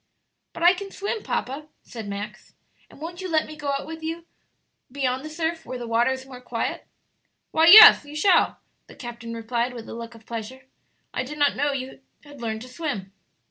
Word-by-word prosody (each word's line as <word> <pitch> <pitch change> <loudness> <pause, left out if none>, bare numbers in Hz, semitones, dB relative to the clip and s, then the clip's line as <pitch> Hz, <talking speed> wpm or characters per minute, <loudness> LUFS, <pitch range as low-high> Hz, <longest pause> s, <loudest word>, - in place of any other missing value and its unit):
"But 335 - -6
I 350 +1 +8
can 395 +2 -7
swim, 405 +3 -4
papa," 285 -1 -3 0.2
said 225 -4 -8
Max; 205 +1 -7 0.3
"and - - -17
won't 345 +3 -7
you 370 - -5
let 315 -2 +2
me 310 - -10
go 295 -2 -3
with 320 +1 -8
you 325 +1 -3
out 340 - -19 0.7
beyond 260 -1 -1
the 310 - -6
surf, 325 +1 -3
where 255 - -6
the 240 - -6
water 230 +2 +2
is 265 0 -3
more 255 -2 -11
quiet?" 235 -2 -4 0.6
"Why 320 +1 +4
yes, 435 +1 +11
you 290 +1 -11
shall," 355 +3 +3 0.3
the - - -14
captain 240 -2 -8
replied, 235 +2 -2
with 230 -2 -8
a - - -7
look 230 0 -8
of 225 -1 -17
pleasure; 235 +3 -7 0.5
"I - - -1
did 285 +4 -7
not 290 -1 +3
know 290 +2 +1
that 275 - -1
you 260 +1 -8 0.2
had 290 -3 -13
learned 220 -1 -3
to - - -10
swim." 250 - -5
265 Hz, 210 wpm, -24 LUFS, 235-320 Hz, 0.7 s, yes